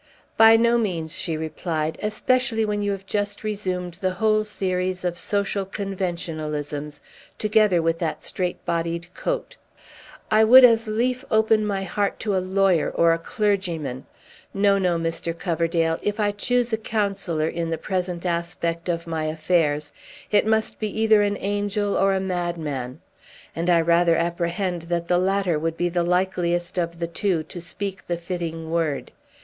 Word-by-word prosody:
"By 225 Hz, 0 st, +8 dB
no 235 Hz, +1 st, +3 dB
means," 170 Hz, -7 st, -2 dB
she 160 Hz, -2 st, -3 dB
replied, 160 Hz, 0 st, -3 dB
"especially 225 Hz, +2 st, +1 dB
when 210 Hz, -1 st, -1 dB
you 205 Hz, 0 st, 0 dB
have 195 Hz, -1 st, -5 dB
just 205 Hz, +1 st, -2 dB
resumed 185 Hz, -4 st, -3 dB
the 185 Hz, -1 st, 0 dB
whole 215 Hz, +2 st, +2 dB
series 185 Hz, -3 st, -2 dB
of 175 Hz, -1 st, 0 dB
social 200 Hz, +2 st, 0 dB
conventionalisms, 160 Hz, -7 st, -4 dB, 0.4 s
together 210 Hz, -5 st, +3 dB
with 165 Hz, 0 st, +1 dB
that 165 Hz, -3 st, -3 dB
strait 180 Hz, -1 st, -3 dB
bodied 170 Hz, +1 st, -2 dB
coat. -, -, -3 dB, 0.7 s
I 215 Hz, +1 st, +6 dB
would 255 Hz, +4 st, +9 dB
as 230 Hz, -1 st, +4 dB
lief 245 Hz, +4 st, 0 dB
open 220 Hz, -1 st, +3 dB
my 195 Hz, -2 st, -1 dB
heart 200 Hz, +2 st, -1 dB
to 210 Hz, -3 st, 0 dB
a -, -, +3 dB
lawyer 185 Hz, -2 st, +2 dB
or 165 Hz, 0 st, +3 dB
a 165 Hz, -, -1 dB
clergyman! 170 Hz, -, -2 dB, 0.5 s
No, 200 Hz, 0 st, +3 dB
no, 180 Hz, -3 st, +1 dB
Mr. 165 Hz, 0 st, -2 dB
Coverdale; 165 Hz, -1 st, 0 dB
if 205 Hz, +1 st, -2 dB
I 205 Hz, -1 st, +2 dB
choose 240 Hz, +3 st, 0 dB
a -, -, +3 dB
counsellor, 200 Hz, -8 st, -1 dB
in 170 Hz, 0 st, -3 dB
the 165 Hz, -, -1 dB
present 180 Hz, -2 st, -3 dB
aspect 170 Hz, 0 st, -2 dB
of 170 Hz, -1 st, -1 dB
my 160 Hz, -2 st, -2 dB
affairs, 155 Hz, -2 st, 0 dB, 0.4 s
it 210 Hz, 0 st, +3 dB
must 220 Hz, 0 st, +1 dB
be 215 Hz, -, -1 dB
either 220 Hz, -1 st, +5 dB
an 205 Hz, 0 st, 0 dB
angel 205 Hz, 0 st, -1 dB
or 195 Hz, 0 st, +3 dB
a -, -, +1 dB
madman; 170 Hz, -9 st, -3 dB, 0.5 s
and 170 Hz, +2 st, -1 dB
I 170 Hz, -1 st, +5 dB
rather 170 Hz, +1 st, +4 dB
apprehend 170 Hz, +2 st, -1 dB
that 170 Hz, -1 st, -1 dB
the 175 Hz, 0 st, +3 dB
latter 190 Hz, -3 st, +1 dB
would 165 Hz, +1 st, -2 dB
be 175 Hz, 0 st, 0 dB
likeliest 175 Hz, 0 st, 0 dB
of 170 Hz, -1 st, -2 dB
the 170 Hz, -, -2 dB
two 170 Hz, -1 st, -1 dB
to 175 Hz, -, -9 dB
speak 190 Hz, +3 st, -6 dB
the 175 Hz, -, -1 dB
fitting 165 Hz, -2 st, -5 dB
word. 165 Hz, -4 st, -1 dB
180 Hz, 160 wpm, -23 LUFS, 165-205 Hz, 0.7 s, would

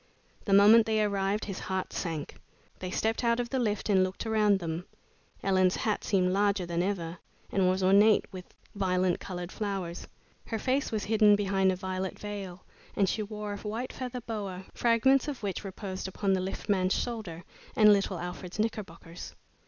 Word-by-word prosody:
The 200 Hz, -, +1 dB
moment 215 Hz, +3 st, +7 dB
they 220 Hz, -1 st, +2 dB
arrived, 200 Hz, 0 st, 0 dB
his 195 Hz, -3 st, -5 dB
heart 190 Hz, -1 st, -3 dB
sank. 160 Hz, -4 st, -4 dB, 0.4 s
They 185 Hz, -, -4 dB
stepped 225 Hz, +5 st, -1 dB
out 235 Hz, 0 st, +2 dB
of 240 Hz, -1 st, -3 dB
the 265 Hz, -, 0 dB
lift 210 Hz, -4 st, -1 dB
and 195 Hz, -3 st, +4 dB
looked 185 Hz, +3 st, -3 dB
around 215 Hz, -2 st, +3 dB
them. 170 Hz, -1 st, -4 dB, 0.6 s
Ellen's 185 Hz, -1 st, +3 dB
hat 215 Hz, -2 st, -1 dB
seemed 185 Hz, -2 st, +2 dB
larger 200 Hz, -2 st, +2 dB
than 170 Hz, 0 st, -1 dB
ever, 175 Hz, -3 st, -3 dB, 0.3 s
and 190 Hz, -2 st, +3 dB
was 185 Hz, +1 st, 0 dB
ornate 200 Hz, +3 st, +5 dB
with 185 Hz, -2 st, -10 dB, 0.2 s
violent 185 Hz, -2 st, +1 dB
colored 180 Hz, -1 st, -6 dB
flowers. 195 Hz, -5 st, -4 dB, 0.4 s
Her 225 Hz, -, -2 dB
face 260 Hz, +5 st, 0 dB
was 215 Hz, -2 st, -1 dB
hidden 215 Hz, -1 st, +5 dB
behind 195 Hz, -2 st, +2 dB
a -, -, -1 dB
violet 185 Hz, 0 st, -4 dB
veil, 200 Hz, -3 st, -7 dB, 0.3 s
and 195 Hz, -, +3 dB
she 215 Hz, -, -1 dB
wore 210 Hz, 0 st, -5 dB
a -, -, -5 dB
white 225 Hz, +5 st, -5 dB
feather 250 Hz, -1 st, -5 dB
boa, 200 Hz, -5 st, -5 dB
fragments 245 Hz, +4 st, +3 dB
of 275 Hz, -6 st, -5 dB
which 195 Hz, -2 st, -3 dB
reposed 190 Hz, -1 st, -5 dB
upon 195 Hz, +1 st, 0 dB
the 190 Hz, -, +1 dB
lift 190 Hz, +3 st, -5 dB
man's 190 Hz, -3 st, +2 dB
shoulder 210 Hz, -8 st, -4 dB, 0.3 s
and 210 Hz, -1 st, +7 dB
little 195 Hz, -2 st, 0 dB
Alfred's 180 Hz, +1 st, -6 dB
knickerbockers. 190 Hz, -6 st, -5 dB
195 Hz, 175 wpm, -29 LUFS, 185-215 Hz, 0.6 s, moment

